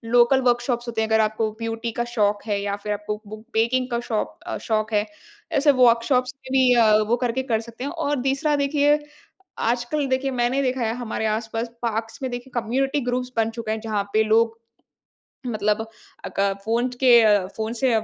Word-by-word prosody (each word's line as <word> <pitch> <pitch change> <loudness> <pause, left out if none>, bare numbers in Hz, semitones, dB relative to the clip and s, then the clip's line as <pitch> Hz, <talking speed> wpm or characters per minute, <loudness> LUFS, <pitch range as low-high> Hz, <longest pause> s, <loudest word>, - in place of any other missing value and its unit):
Local 245 +2 +5
workshops 240 0 0
होते 225 -1 -2
हैं 220 - 0
अगर 220 0 +3
आपको 215 0 0
ब्यूटी 225 +1 -3
का - - +2
शौक 205 -2 +1
है 205 -2 0
या 200 0 -2
फ़िर 210 +1 -3
आपको 210 +1 -5
बूक 215 +1 -10
बेकिंग 250 +3 +1
का 235 - 0
शौक 210 - -2
अ 110 - -3
शौक 215 0 0
है। 210 0 +2 0.5
ऐसे 290 +1 +5
वर्कशॉप्स 245 +2 +3
में 265 -1 -14
भी 250 -1 +5 0.3
वो 235 - +4
करके 245 +2 -1
कर 220 - +2
सकते 235 +2 -9
हैं 285 - -3
और 290 -5 -1
तीसरा 275 +3 +1
देखिए 290 +1 +3 0.6
आजकल 240 +5 0
देखिए, 260 +1 0
मैंने 250 +2 +1
देखा 255 -1 -1
है 225 -1 0
हमारे 230 -2 -3
आस-पास 225 +2 -2 0.2
पार्क्स 225 -1 -3
में 260 - -1
देखिए 245 +2 -7
कम्युनिटी 270 +5 0
ग्रुप्स 250 0 -2
बन 225 0 +2
चुके 225 -1 -5
हैं 220 - -2
जहाँ 215 -2 -1
पे 220 0 +4
लोग, 225 +1 +2 0.9
मतलब 215 -2 0 0.5
अक - - -4 0.2
फ़ोन 230 +3 +1
के 255 - +6 0.5
फ़ोन 220 0 -3
से 265 - +3
235 Hz, 185 wpm, -23 LUFS, 220-255 Hz, 0.9 s, के